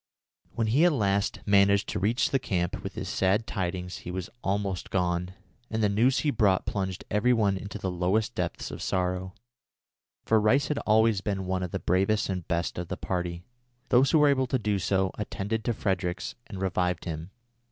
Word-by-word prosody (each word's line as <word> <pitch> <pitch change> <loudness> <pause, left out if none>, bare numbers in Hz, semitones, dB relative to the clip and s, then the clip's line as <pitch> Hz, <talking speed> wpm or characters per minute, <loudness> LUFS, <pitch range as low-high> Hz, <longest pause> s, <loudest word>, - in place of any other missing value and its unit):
When 115 - +1
he 125 +9 +3
at 175 -2 +5
last 100 -5 0
managed 100 0 +4
to - - -2
reach 110 +6 +1
the 135 - +2
camp 90 -8 -2
with - - -6
his - - -4
sad 95 +4 +1
tidings 90 -3 -3
he - - -9
was 90 0 -5
almost 95 -2 -1
gone, 90 0 -1 0.3
and 110 0 -1
the 105 - +4
news 120 +6 +3
he 150 - +1
brought 100 -7 +2
plunged 95 -2 -3
every 110 +5 +3
one 105 -4 +2
into 100 +2 -6
the 95 -2 -3
lowest 95 +5 0
depths - - -3
of - - -7
sorrow, 90 0 -1 0.9
for 110 -1 +3
Rice 130 +7 +3
had 150 - 0
always 110 -1 +4
been 95 -2 -2
one 95 0 -1
of 90 - -3
the - - -2
bravest 95 +4 +1
and 90 -3 -3
best 85 +1 -1
of 90 - -4
the - - -4
party. 90 -1 -3 0.5
Those 130 +2 +5
who 160 - +4
were 150 -1 +5
able 130 -2 +2
to 130 - +1
do 105 -3 0
so, 95 0 +1
attended 105 +1 -3
to 120 - +1
Fredericks 95 -3 -2
and 100 -4 -7
revived 90 -2 -1
him. 80 0 -5
100 Hz, 195 wpm, -28 LUFS, 90-110 Hz, 0.9 s, at